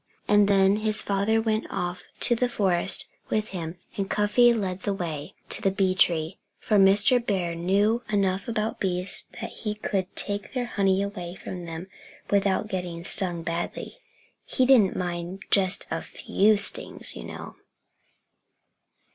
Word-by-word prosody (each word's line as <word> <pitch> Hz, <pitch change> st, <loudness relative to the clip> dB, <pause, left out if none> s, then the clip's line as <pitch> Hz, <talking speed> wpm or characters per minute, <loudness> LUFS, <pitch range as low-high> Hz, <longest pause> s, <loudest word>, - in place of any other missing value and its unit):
And 205 Hz, -1 st, +4 dB
then 195 Hz, 0 st, +4 dB
his 215 Hz, 0 st, +1 dB
father 200 Hz, +3 st, +1 dB
went 220 Hz, 0 st, -1 dB
off 180 Hz, 0 st, -4 dB
into 240 Hz, -, +5 dB
the 245 Hz, +1 st, 0 dB
forest 190 Hz, -5 st, +2 dB, 0.2 s
with 215 Hz, 0 st, -1 dB
him 170 Hz, -2 st, -6 dB, 0.2 s
and 195 Hz, -1 st, -3 dB
Cuffy 210 Hz, +4 st, +4 dB
led 195 Hz, -5 st, -2 dB
the 200 Hz, +1 st, -2 dB
way 160 Hz, -6 st, -5 dB
to -, -, +4 dB
the 195 Hz, -, +2 dB
bee 190 Hz, -1 st, +1 dB
tree; 165 Hz, -3 st, +1 dB, 0.2 s
for 210 Hz, -, 0 dB
Mr. 205 Hz, +5 st, +5 dB
Bear 185 Hz, -6 st, -1 dB
knew 200 Hz, +7 st, +1 dB
enough 195 Hz, -2 st, 0 dB
about 220 Hz, -1 st, -2 dB
bees 180 Hz, -1 st, +3 dB
so -, -, -17 dB
that -, -, -5 dB
he 210 Hz, -2 st, -5 dB
could 195 Hz, -3 st, -3 dB
take 205 Hz, -1 st, 0 dB
their 250 Hz, -2 st, -1 dB
honey 195 Hz, -4 st, +1 dB
away 180 Hz, -3 st, -6 dB
from 180 Hz, -2 st, -8 dB
them 165 Hz, +1 st, -7 dB, 0.5 s
without 200 Hz, 0 st, +1 dB
getting 180 Hz, -4 st, -5 dB
stung 175 Hz, -2 st, -1 dB
badly. 170 Hz, -, -5 dB, 0.4 s
He 260 Hz, -, 0 dB
didn't 245 Hz, -8 st, +5 dB
mind 175 Hz, +2 st, -4 dB
just 190 Hz, -2 st, +3 dB
a -, -, -2 dB
few 210 Hz, +2 st, +1 dB
stings, 200 Hz, -, -5 dB
you -, -, -8 dB
know. -, -, -9 dB
195 Hz, 155 wpm, -25 LUFS, 180-210 Hz, 0.5 s, into